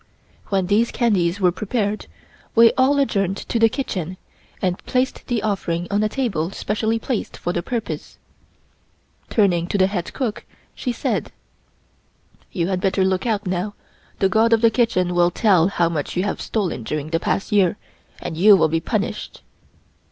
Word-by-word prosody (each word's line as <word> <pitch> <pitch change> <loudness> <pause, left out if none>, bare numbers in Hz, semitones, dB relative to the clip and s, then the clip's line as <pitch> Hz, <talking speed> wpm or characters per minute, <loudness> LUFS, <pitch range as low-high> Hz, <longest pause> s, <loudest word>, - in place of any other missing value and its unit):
When 195 -2 +1
these 210 +5 +2
candies 200 -6 +1
were 180 -2 +4
prepared, 210 +2 -2 0.5
we 230 0 +7
all 265 +2 +3
adjourned 195 -8 +1
to 230 - -3
the 225 0 +5
kitchen 185 - -4 0.4
and 180 -1 -2
placed 255 +1 -1
the 235 -4 -1
offering 175 -5 -1
on 205 +1 +2
a 215 - +1
table 205 - -1
specially 220 +3 -1
placed 225 0 -3
for 175 - -3
the 175 - -1
purpose. 230 +4 -5 1.1
Turning 180 -6 +2
to 200 - -1
the 190 - +5
head 190 -3 -3
cook, 240 -6 -3 0.3
she 250 - -3
said: 235 - -2 1.2
"You 175 -1 -1
had 185 -1 -1
better 190 0 +2
look 190 +4 0
out 210 -2 0
now; 185 +3 -2 0.4
the 195 - +3
God 220 +4 +3
of 225 - +3
the 230 -1 +5
Kitchen 200 -7 +1
will 175 0 +4
tell 185 -3 +3
how 175 -3 +1
much 160 0 -3
you 180 - +2
have 205 - -2
stolen 195 - -2
during 150 +6 -4
the 165 - +1
past 195 - -2
year, 200 -2 +3 0.4
and 160 - -5
you 200 +5 +7
will 160 - +3
be 165 +1 +1
punished." 210 +4 -3
200 Hz, 170 wpm, -21 LUFS, 175-225 Hz, 1.2 s, we